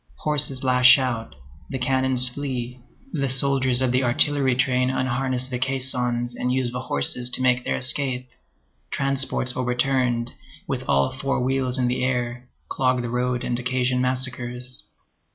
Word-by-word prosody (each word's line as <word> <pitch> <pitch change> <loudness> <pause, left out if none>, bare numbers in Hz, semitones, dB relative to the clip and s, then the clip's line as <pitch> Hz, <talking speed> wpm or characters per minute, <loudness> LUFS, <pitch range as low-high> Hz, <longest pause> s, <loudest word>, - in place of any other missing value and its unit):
Horses 140 -3 0
lash 125 0 +6
out, 125 -4 -3 0.3
the 135 - -3
cannons 130 0 +1
flee; 125 -2 -5 0.3
the 140 -3 -1
soldiers 130 -1 +3
of 130 - +1
the 130 +1 +2
artillery 130 +1 +2
train 130 0 +1
unharness 130 0 -1
the 125 -2 -4
caissons 125 -2 0
and 125 - -2
use 130 -1 0
the 125 - -4
horses 125 - 0
to 125 - +2
make 125 0 +2
their - - -1
escape; 130 -1 0 0.6
transports 135 -2 -1
overturned, 125 -1 0 0.4
with - - -2
all 70 0 +2
four 135 +1 -2
wheels 130 0 0
in 125 -1 +1
the 125 +1 -1
air, 125 -1 -2 0.2
clog 130 -2 0
the 120 - -4
road 125 0 -1
and 120 0 -2
occasion 125 0 0
massacres. 125 -1 -2
125 Hz, 150 wpm, -23 LUFS, 125-130 Hz, 0.6 s, lash